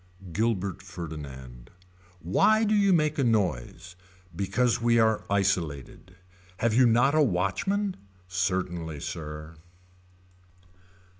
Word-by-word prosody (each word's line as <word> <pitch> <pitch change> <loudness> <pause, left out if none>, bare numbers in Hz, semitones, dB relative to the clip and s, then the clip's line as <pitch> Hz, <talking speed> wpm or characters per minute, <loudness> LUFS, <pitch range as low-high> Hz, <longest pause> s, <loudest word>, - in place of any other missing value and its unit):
Gilbert 100 -2 -1
Ferdinand. 70 -9 -9 0.5
Why 215 - +3
do 215 0 +2
you 200 -2 +4
make 155 -3 +2
a - - +3
noise. 90 - -1 0.4
Because 100 +7 0
we 115 0 +3
are 110 -1 +2
isolated. 90 -4 -2 0.4
Have 115 -1 +1
you 125 +2 +5
not 120 +5 +3
a 155 - +4
watchman. 150 - 0 0.3
Certainly 90 -4 -2
sir. 75 -1 -7
95 Hz, 100 wpm, -27 LUFS, 85-120 Hz, 0.5 s, you